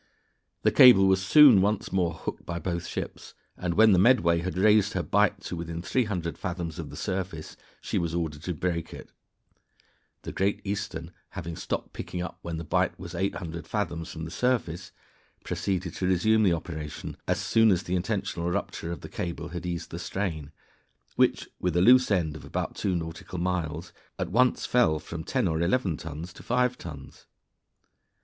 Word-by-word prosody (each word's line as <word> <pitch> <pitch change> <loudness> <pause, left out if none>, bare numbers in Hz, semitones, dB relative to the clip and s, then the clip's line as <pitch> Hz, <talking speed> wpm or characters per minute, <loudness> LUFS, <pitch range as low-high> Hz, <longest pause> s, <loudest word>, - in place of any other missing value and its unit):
The - - +4
cable 100 -7 +8
was 95 0 +3
soon 130 -1 +8
once 105 +2 0
more 90 -3 +1
hooked - - -6
by 85 - -4
both 85 0 -3
ships, - - -6 0.2
and 85 -2 -2
when 110 0 +7
the 95 - +5
Medway 90 -7 +4
had 90 +1 -4
raised 105 +1 +4
her 95 - -1
bight 105 -1 +2
to 90 - -5
within 85 0 -5
300 95 -8 -1
fathoms 85 -4 -4
of - - -5
the - - -9
surface 90 -4 -4 0.3
she - - -1
was 85 -1 -2
ordered 80 -4 -3
to 90 0 -3
break 85 0 -2
it. - - -12 1.1
The - - -5
Great 100 +2 0
Eastern 100 -5 -4 0.3
having 85 -3 -5
stopped - - -4
picking 90 - -6
up 90 - -5
when 85 -1 -4
the 80 - -5
bight 80 - 0
was 90 -2 -8
800 85 -2 -3
fathoms 85 -6 -3
from 80 -1 -6
the 80 - -7
surface, 100 -9 -1 0.5
proceeded 95 -3 -2
to 90 - -2
resume 110 +5 +3
the 95 -5 +4
operation 80 -2 -5
as - - +1
soon 115 0 +4
as 95 -2 +2
the 90 - -2
intentional 95 -2 -2
rupture 85 -1 -3
of 85 - -6
the - - -8
cable 85 -1 -5
had 90 0 -5
eased 85 -1 -4
the 85 - -5
strain, 85 -6 -3 0.6
which, - - +2
with 90 -1 0
a - - +4
loose 125 +4 +6
end 85 -7 +1
of 75 - -9
about 70 - -4
two 95 -3 -1
nautical 85 +2 -5
miles, 85 -2 -2 0.2
at - - -3
once 125 +4 +3
fell 120 -11 +3
from 80 +1 -7
10 125 +3 0
or 80 -1 0
11 90 -2 +1
tons 85 +2 -7
to - - -12
5 125 0 +1
tons. 75 - -10
90 Hz, 185 wpm, -27 LUFS, 85-100 Hz, 1.1 s, cable